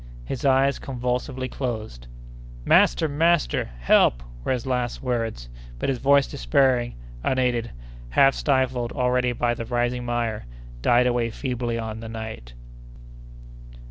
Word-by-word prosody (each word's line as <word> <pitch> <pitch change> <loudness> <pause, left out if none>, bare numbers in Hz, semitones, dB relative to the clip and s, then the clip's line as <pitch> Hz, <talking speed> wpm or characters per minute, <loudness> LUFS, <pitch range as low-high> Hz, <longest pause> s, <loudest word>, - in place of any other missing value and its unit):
His 130 - -4
eyes 135 0 +3
convulsively 125 0 -3
closed! 110 - -5 0.6
"Master! - - +4
master!—Help!" 140 - +2 0.2
were - - -1
his 125 -1 -1
last 125 -2 -2
words; 115 - -2 0.3
but - - -2
his 130 -3 -1
voice, 140 +1 +4
despairing, 120 - +1 0.3
unaided, 125 -3 0 0.4
half 135 - +5
stifled 130 -4 0
already 125 0 +1
by 120 0 0
the 115 - -5
rising 120 +1 -1
mire, 120 - -2 0.3
died 120 - +4
away 120 -2 +1
feebly 120 -1 -3
on 110 -1 -5
the 115 0 -7
night. 110 - -7
120 Hz, 120 wpm, -24 LUFS, 115-130 Hz, 0.6 s, half